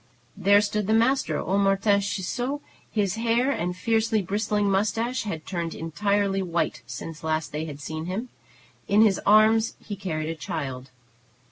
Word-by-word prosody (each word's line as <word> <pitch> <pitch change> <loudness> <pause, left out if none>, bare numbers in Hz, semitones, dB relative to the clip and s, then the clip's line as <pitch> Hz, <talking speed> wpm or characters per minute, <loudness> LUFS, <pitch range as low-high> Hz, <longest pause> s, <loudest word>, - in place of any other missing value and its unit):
There 200 +1 +5
stood 210 -1 -1
the 220 - +3
master, 255 +4 +2
old 195 +2 0
Martin 200 +1 +3
Ciseaux. 220 +8 -2 0.3
His 205 -1 0
hair 235 +4 +2
and 180 -7 -2
fiercely 220 +1 +1
bristling 205 +2 0
mustache 225 +5 0
had 165 -7 -5
turned 170 -3 -3
entirely 195 +4 0
white 170 -9 -1
since 150 +5 -7
they 160 - -6
had - - 0 0.4
last 145 - -13
seen 160 0 -4
him. 215 +7 -3 0.6
In 210 +2 +5
his 205 -3 +3
arms 220 +2 +5
he 205 - -7
carried 160 -5 -3
a - - -1
child. 135 -3 -5
200 Hz, 155 wpm, -25 LUFS, 170-220 Hz, 0.6 s, There